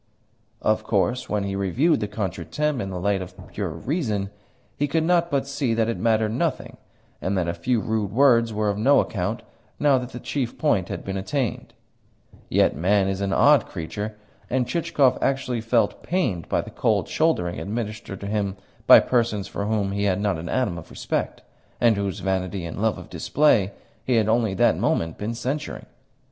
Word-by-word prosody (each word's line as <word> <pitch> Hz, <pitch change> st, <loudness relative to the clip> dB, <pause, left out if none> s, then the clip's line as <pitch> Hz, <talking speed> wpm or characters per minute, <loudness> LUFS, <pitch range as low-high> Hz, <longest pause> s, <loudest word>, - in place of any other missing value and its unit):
Of -, -, +2 dB
course, 125 Hz, +1 st, 0 dB
when 105 Hz, -1 st, 0 dB
he 100 Hz, 0 st, -3 dB
reviewed 110 Hz, -, +2 dB
the 105 Hz, -, -2 dB
contretemps 105 Hz, -, -2 dB
in 95 Hz, -, -4 dB
the 90 Hz, -1 st, -4 dB
light 100 Hz, +1 st, 0 dB
of 90 Hz, 0 st, -8 dB
pure 95 Hz, 0 st, -3 dB
reason, 105 Hz, -, -2 dB, 0.4 s
he 145 Hz, -, 0 dB
could 160 Hz, +3 st, +1 dB
not 170 Hz, 0 st, +2 dB
but 140 Hz, -3 st, 0 dB
see 140 Hz, -4 st, -1 dB
that 110 Hz, -1 st, +1 dB
it 115 Hz, -, -2 dB
mattered 110 Hz, -1 st, +2 dB
nothing, 150 Hz, +3 st, -2 dB, 0.4 s
and 95 Hz, +1 st, -1 dB
that 90 Hz, -2 st, 0 dB
a 85 Hz, -, 0 dB
few 125 Hz, +5 st, 0 dB
rude 110 Hz, -2 st, -1 dB
words 115 Hz, -2 st, +4 dB
were 105 Hz, 0 st, 0 dB
of 100 Hz, -, -4 dB
no 140 Hz, +6 st, +5 dB
account -, -, -2 dB, 0.4 s
now 140 Hz, -3 st, +4 dB
that 125 Hz, -1 st, -6 dB
the 125 Hz, -, -8 dB
chief 125 Hz, -3 st, -3 dB
point 110 Hz, -, +1 dB
had -, -, -5 dB
been 95 Hz, 0 st, -3 dB
attained; 125 Hz, +4 st, -3 dB, 0.7 s
yet -, -, +3 dB
man 95 Hz, +5 st, +2 dB
is 95 Hz, 0 st, -2 dB
an 100 Hz, -1 st, -1 dB
odd 140 Hz, +2 st, +5 dB
creature, 105 Hz, +5 st, -5 dB, 0.3 s
and 125 Hz, -1 st, 0 dB
Chichikov 150 Hz, -3 st, +2 dB
actually 130 Hz, -3 st, 0 dB
felt 115 Hz, +1 st, +1 dB
pained 125 Hz, -, -1 dB
by -, -, +1 dB
the -, -, -10 dB
cold -, -, +1 dB
shouldering 155 Hz, -, 0 dB
administered 105 Hz, -2 st, -5 dB
to -, -, -5 dB
him 100 Hz, -1 st, -1 dB, 0.3 s
by -, -, +10 dB
persons 115 Hz, -5 st, 0 dB
for 100 Hz, -, -4 dB
whom 105 Hz, -3 st, 0 dB
he 100 Hz, +1 st, -1 dB
had 95 Hz, -1 st, +1 dB
not 100 Hz, -5 st, 0 dB
an 85 Hz, -, -6 dB
atom 115 Hz, -10 st, 0 dB
of -, -, -13 dB
respect, -, -, -3 dB, 0.4 s
and 115 Hz, -2 st, +4 dB
whose 100 Hz, -1 st, -3 dB
vanity 95 Hz, -1 st, -2 dB
and 85 Hz, +4 st, -5 dB
love 110 Hz, 0 st, +1 dB
of -, -, -10 dB
display 120 Hz, -10 st, +2 dB, 0.3 s
he 125 Hz, -, +1 dB
had 110 Hz, -2 st, +3 dB
only 110 Hz, -3 st, +2 dB
that -, -, +4 dB
moment 80 Hz, -1 st, 0 dB
been 110 Hz, +3 st, -3 dB
censuring. 135 Hz, +6 st, -4 dB
110 Hz, 190 wpm, -24 LUFS, 100-130 Hz, 0.7 s, by